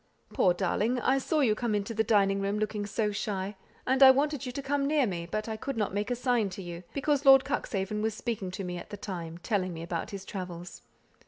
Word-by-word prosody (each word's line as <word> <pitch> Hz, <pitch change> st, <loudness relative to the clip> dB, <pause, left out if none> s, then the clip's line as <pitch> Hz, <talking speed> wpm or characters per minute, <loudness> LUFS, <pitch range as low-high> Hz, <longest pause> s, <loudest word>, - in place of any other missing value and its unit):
"Poor 180 Hz, -, +4 dB
darling! 205 Hz, +7 st, 0 dB
I 265 Hz, +3 st, +2 dB
saw 305 Hz, +3 st, 0 dB
you 235 Hz, -6 st, +4 dB
come 220 Hz, -1 st, -1 dB
into 205 Hz, +2 st, -2 dB
the 220 Hz, 0 st, +1 dB
dining 200 Hz, -2 st, +3 dB
room, 200 Hz, +1 st, -1 dB
looking 210 Hz, -1 st, -2 dB
so 210 Hz, +1 st, 0 dB
shy; 200 Hz, -1 st, -3 dB, 0.3 s
and 260 Hz, +1 st, +1 dB
I 265 Hz, -, +11 dB
wanted 280 Hz, 0 st, +2 dB
you -, -, -3 dB
to 280 Hz, -, -5 dB
come 275 Hz, 0 st, 0 dB
near 295 Hz, -2 st, +3 dB
me, 170 Hz, -5 st, -4 dB
but 215 Hz, +4 st, -2 dB
I 220 Hz, -, -3 dB
could 270 Hz, +3 st, -4 dB
not 210 Hz, -3 st, -1 dB
make 205 Hz, +1 st, -1 dB
a 245 Hz, -, 0 dB
sign 245 Hz, -4 st, +1 dB
to -, -, -5 dB
you, 175 Hz, -1 st, -7 dB
because 285 Hz, 0 st, 0 dB
Lord 270 Hz, -1 st, +8 dB
Cuxhaven 210 Hz, -7 st, -2 dB
was 220 Hz, 0 st, -1 dB
speaking 220 Hz, -5 st, -3 dB
to 185 Hz, +2 st, -5 dB
me 180 Hz, -1 st, -4 dB
at -, -, -11 dB
the 205 Hz, -, -7 dB
time, 170 Hz, -5 st, -6 dB
telling 185 Hz, -1 st, -1 dB
me 165 Hz, -, -6 dB
about 170 Hz, +2 st, -3 dB
his 195 Hz, -2 st, -7 dB
travels. 180 Hz, -2 st, -7 dB
210 Hz, 240 wpm, -29 LUFS, 190-250 Hz, 0.3 s, I